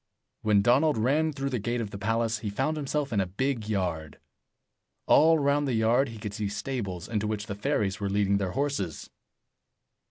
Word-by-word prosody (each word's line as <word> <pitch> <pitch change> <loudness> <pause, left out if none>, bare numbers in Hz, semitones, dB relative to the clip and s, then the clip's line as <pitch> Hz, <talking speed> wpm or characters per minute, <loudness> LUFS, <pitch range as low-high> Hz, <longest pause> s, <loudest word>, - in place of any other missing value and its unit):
When 105 -2 +3
Donald 140 +6 +3
ran 145 +8 +2
through 140 -1 -3
the 125 - -1
gate 120 +4 -2
of 110 -3 -4
the 100 - -7
palace, 115 +1 0
he 105 - -4
found 135 +9 -1
himself 145 -2 -2
in 105 - +2
a 95 - -1
big 115 +3 -2
yard. 85 -7 -2 0.9
All 160 +2 +6
round 145 0 +1
the 125 - 0
yard 120 +4 +3
he 115 - -9
could 105 -1 -6
see 105 -2 -2
stables, 100 -7 -4
into 105 -2 -1
which 105 -1 -3
the 100 - -5
fairies 100 0 -1
were 100 -1 -2
leading 100 0 +2
their 95 -2 -2
horses. 135 - -2
110 Hz, 190 wpm, -27 LUFS, 100-135 Hz, 0.9 s, All